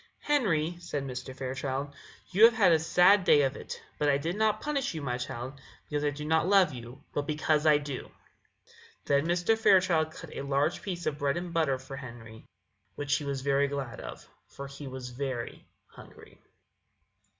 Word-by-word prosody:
"Henry," 175 - +1
said 160 -5 -4
Mr. 130 0 -6
Fairchild, 135 +2 -3 0.4
"you 205 +5 +7
have 230 0 +5
had 195 -6 +5
a 160 - +5
sad 180 +5 +5
day 145 -4 +5
of 135 0 0
it; - - -7 0.2
but 150 - +2
I 140 - +4
did 165 +5 -3
not 215 0 +2
punish 280 - -2
you, 155 - -4
my 125 -2 -2
child, 125 +3 -6 0.3
because 150 -1 -2
I 145 - +2
do 145 +1 -6
not 160 +2 +2
love 190 -6 +5
you, 125 +3 -10
but 145 0 -2
because 155 0 +1
I 150 -1 +7
do." 145 -3 -6 1.0
Then 140 +2 +2
Mr. 175 +5 +2
Fairchild 185 -7 +4
cut 160 0 -11
a - - -4
large 140 +4 0
piece 175 -4 -5
of 150 -1 -2
bread 140 +3 0
and 175 -1 -5
butter 155 -5 +2
for 130 +1 -9
Henry, 115 -4 -10 0.5
which 145 0 0
he 150 - -6
was 140 -1 -3
very 140 +1 +2
glad 135 -5 -5
of, - - -9 0.2
for 140 - -9
he 140 +1 -9
was 130 -1 -7
very 125 -2 -5 0.2
hungry. - - -16
145 Hz, 185 wpm, -29 LUFS, 135-170 Hz, 1.0 s, you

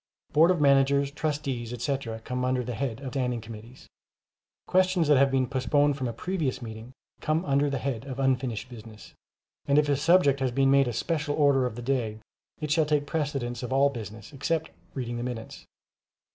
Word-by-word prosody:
Boards 165 +4 +6
of 175 - -3
Managers, 140 0 +3
Trustees, 140 -6 -3
etc., 125 -2 -3
come 125 +2 -3
under 125 0 0
the 125 +1 -4
head 125 -1 -3
of 135 -2 -5
standing 125 -3 -1
committees. 115 +2 -11 0.8
Questions 185 -3 +2
that 145 -3 +5
have 140 0 +5
been 135 -1 +1
postponed 140 +3 +1
from 130 -2 -3
a - - -2
previous 155 +2 -2
meeting, 110 0 -8 0.3
come 155 +4 0
under 140 0 +2
the 140 - -1
head 130 -3 -3
of 135 -2 -6
unfinished 130 -3 0
business; 110 -3 -12 0.5
and 140 0 +3
if 150 0 +4
a 145 - +2
subject 145 -1 +4
has 130 -1 +1
been 135 +2 +2
made 140 -1 +4
a 120 - -2
"special 150 +1 -1
order" 140 -4 +3
for 110 - -12
the 120 - -7
day, 120 -4 -1 0.4
it 150 -1 -3
shall 155 0 +3
take 150 -1 +1
precedence 140 -6 -2
of 125 - -5
all 140 +1 +4
business 110 +1 -8
except 160 +3 -2 0.2
reading 120 -3 -3
the 120 - -3
minutes. 120 -2 -7
135 Hz, 190 wpm, -27 LUFS, 120-145 Hz, 0.8 s, Boards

